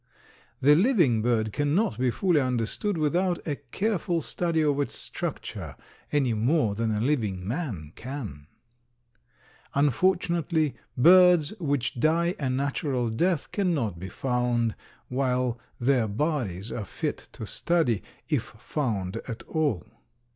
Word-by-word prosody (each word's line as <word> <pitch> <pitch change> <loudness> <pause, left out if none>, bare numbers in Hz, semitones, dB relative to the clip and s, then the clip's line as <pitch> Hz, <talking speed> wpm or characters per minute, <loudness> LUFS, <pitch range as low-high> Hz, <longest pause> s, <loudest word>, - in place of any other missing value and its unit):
The 145 +3 +7
living 170 - +4
bird 110 -2 +1
cannot 145 - +1
be 130 0 +2
fully 170 +4 +2
understood 130 - -1
without 175 +4 +1
a 145 -3 -1
careful 175 - -1
study 170 -3 0
of 145 -2 +2
its 145 - -1
structure - - -5 0.4
any 135 -5 +2
more 115 +1 +2
than 115 +2 -1
a 105 -1 0
living 105 -8 0
man 110 - -3
can. 110 - -7 1.3
Unfortunately, 165 +1 +2 0.2
birds 175 +2 +6
which 145 -5 -1
die 170 +5 +2
a 140 -3 -1
natural 135 -2 -1
death 170 +7 0
cannot 150 - 0
be 95 +2 -6
found 120 0 0 0.3
while 125 -2 0 0.2
their 125 -2 +2
bodies 110 - -2
are 115 - -3
fit - - -4
to 110 - -6
study, 155 - +1 0.3
if - - 0
found 105 -10 -2
at 115 -3 -6
all. 145 - -1
135 Hz, 125 wpm, -27 LUFS, 115-160 Hz, 1.3 s, The